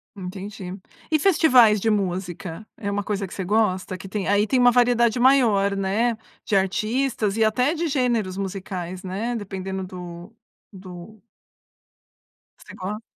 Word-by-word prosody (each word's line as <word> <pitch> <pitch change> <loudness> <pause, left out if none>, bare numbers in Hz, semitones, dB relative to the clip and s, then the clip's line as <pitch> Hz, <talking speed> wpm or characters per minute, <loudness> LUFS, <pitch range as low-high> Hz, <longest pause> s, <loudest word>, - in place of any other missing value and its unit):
Entendi. 190 0 -7 0.3
E 310 - +3
festivais 260 - +5
de 225 - 0
música, 185 -1 -3
é 200 -1 -4
uma 205 0 -1
coisa 205 -1 -2
que 190 - -10
você 190 - -4
gosta? 190 -3 0
Que 195 - -10
tem 205 -2 -3
aí 205 +1 +3
tem 250 +4 +1
uma 245 0 +6
variedade 240 -1 +3
maior, 225 -7 +4
né, 215 +4 0 0.3
de 210 - -5
artistas 215 +3 0
e 220 - +4
até 250 +8 +2
de 340 0 -2
gêneros 240 -9 0
musicais, 185 -2 -5
né, 210 +6 -3
dependendo 190 -2 -5
do 180 +2 -9 0.4
do 185 +3 -11 1.4
Você - - -13
go 210 +4 -5
205 Hz, 145 wpm, -23 LUFS, 190-235 Hz, 1.4 s, uma